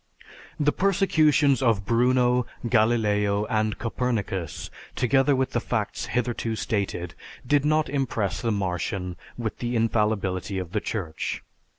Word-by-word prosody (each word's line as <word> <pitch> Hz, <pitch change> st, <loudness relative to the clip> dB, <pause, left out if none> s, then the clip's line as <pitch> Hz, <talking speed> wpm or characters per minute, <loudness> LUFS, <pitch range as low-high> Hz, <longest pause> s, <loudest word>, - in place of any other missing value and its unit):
The 150 Hz, 0 st, +3 dB
persecutions 155 Hz, -, +3 dB
of 115 Hz, -6 st, +2 dB
Bruno, 125 Hz, +1 st, +3 dB, 0.2 s
Galileo, 105 Hz, -3 st, +2 dB
and 110 Hz, -1 st, +1 dB
Copernicus, 105 Hz, -, -3 dB, 0.2 s
together 135 Hz, +3 st, +3 dB
with 130 Hz, 0 st, 0 dB
the -, -, +1 dB
facts -, -, -2 dB
hitherto 120 Hz, -1 st, -1 dB
stated, 95 Hz, -6 st, -2 dB, 0.3 s
did 145 Hz, +2 st, +2 dB
not 155 Hz, 0 st, +2 dB
impress 110 Hz, -8 st, -1 dB
the 115 Hz, -, 0 dB
Martian 90 Hz, -2 st, -2 dB, 0.2 s
with 115 Hz, -3 st, -4 dB
the 120 Hz, 0 st, -2 dB
"infallibility" 105 Hz, -4 st, 0 dB
of 90 Hz, -3 st, -4 dB
the 105 Hz, -, -1 dB
Church. 85 Hz, -8 st, -4 dB
115 Hz, 120 wpm, -25 LUFS, 100-130 Hz, 0.3 s, The